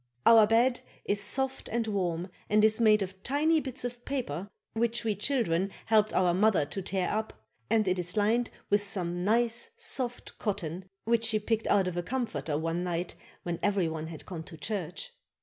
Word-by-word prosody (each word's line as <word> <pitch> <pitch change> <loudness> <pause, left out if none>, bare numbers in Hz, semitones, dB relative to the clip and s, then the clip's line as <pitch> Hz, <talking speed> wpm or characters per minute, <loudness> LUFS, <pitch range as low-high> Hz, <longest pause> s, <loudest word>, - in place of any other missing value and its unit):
Our 225 -2 +8
bed 240 +3 +3 0.2
is 205 0 0
soft 265 +6 -1
and 230 0 0
warm 180 -4 -1 0.2
and 210 +1 +5
is 220 +1 +3
made 215 -2 +5
of 190 0 -8
tiny 305 +6 +2
bits 260 -4 -5
of 245 0 -5
paper 205 - -3 0.2
which 230 +1 0
we 220 -2 +1
children 200 -6 +1 0.2
helped 215 -1 +3
our 180 -2 +3
mother 195 -4 +3
to 195 - -5
tear 190 0 -1
up 220 +1 -2 0.4
and 215 -3 +3
it 185 0 +1
is 180 +3 -3
lined 225 +3 +2 0.2
with 205 0 +4
some 180 -3 -2
nice 235 - +1
soft 255 - 0
cotton 185 -4 -3 0.2
which 230 0 +2
she 220 -1 +3
picked 220 +1 -1
out 195 -2 +3
of 180 -1 -3
a - - +1
comforter 170 - -2
one 165 +2 -1
night 175 0 -2 0.3
when 175 -1 -3
every 200 -4 +2
one 160 0 -4
had 160 -2 -8
gone 175 -4 -6
to 165 - -11
church. 200 - -4
205 Hz, 185 wpm, -29 LUFS, 180-230 Hz, 0.4 s, Our